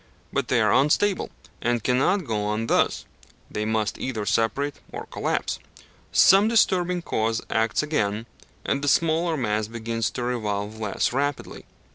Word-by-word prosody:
But - - 0
they 125 - +2
are 105 -1 +3
unstable, 150 +10 +2 0.3
and 120 -2 0
cannot 150 +9 +2
go 110 -4 -1
on 105 +2 -1
thus: - - +1 0.5
they 105 - -2
must 110 -1 -1
either 115 -5 -3
separate 115 +8 0
or - - -6
collapse. - - -2 0.5
Some 195 +3 +6
disturbing 180 -6 +2
cause 110 -4 0
acts 110 +6 +1
again, 110 -8 -1 0.4
and 140 - 0
the - - -1
smaller 165 +2 +2
mass 105 -4 -1
begins 115 -1 -2
to 125 - -5
revolve 110 -3 -2
less 105 +2 -1
rapidly. 145 +1 -3
120 Hz, 145 wpm, -24 LUFS, 110-150 Hz, 0.5 s, Some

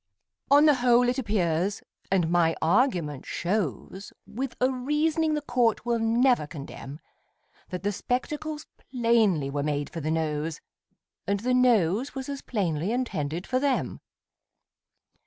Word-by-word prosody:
On 290 +2 +6
the 300 - +7
whole 245 0 +4
it 250 +2 -1
appears, 195 -4 0 0.3
and 175 -4 +2
my 170 -2 +3
argument 170 - +1
shows 190 - -3
With 260 +1 -5
a 255 +1 +2
reasoning 305 +4 0
the 300 - -3
court 240 -5 +1
will 235 -1 +1
never 235 - +2
condemn, 140 -1 -9 0.7
That 180 0 -5
the 205 - +1
spectacles 300 +8 -3 0.2
plainly 225 - +2
were 145 0 -2
made 145 0 -2
for 165 - -5
the 155 - -2
Nose, 155 -1 -2 0.7
And 200 0 0
the 250 +2 0
Nose 240 - +2
was 265 0 -5
as 280 -1 -5
plainly 180 -4 -1
intended 180 - -2
for 255 - 0
them. 280 -1 -1
220 Hz, 140 wpm, -26 LUFS, 165-255 Hz, 0.7 s, the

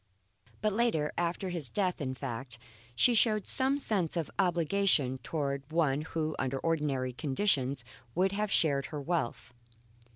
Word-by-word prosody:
But 215 -1 +1
later 205 -10 +1
after 175 +2 -2
his 165 -8 -1
death, 185 -4 -1
in 130 -2 -3
fact 130 -2 -5 0.4
she 245 - +5
showed 215 -2 +3
some 270 +1 +5
sense 190 - -1
of 165 - -2
obligation 175 -7 +2
towards 140 0 -3
one 155 -3 +1
who 155 0 -3
under 135 0 -1
ordinary 140 -5 -1
conditions 135 - 0 0.3
would 185 +2 +2
have 210 +1 -1
shared 140 -4 +2
her 150 - -5
wealth. 140 -6 -3
160 Hz, 140 wpm, -31 LUFS, 135-190 Hz, 0.4 s, she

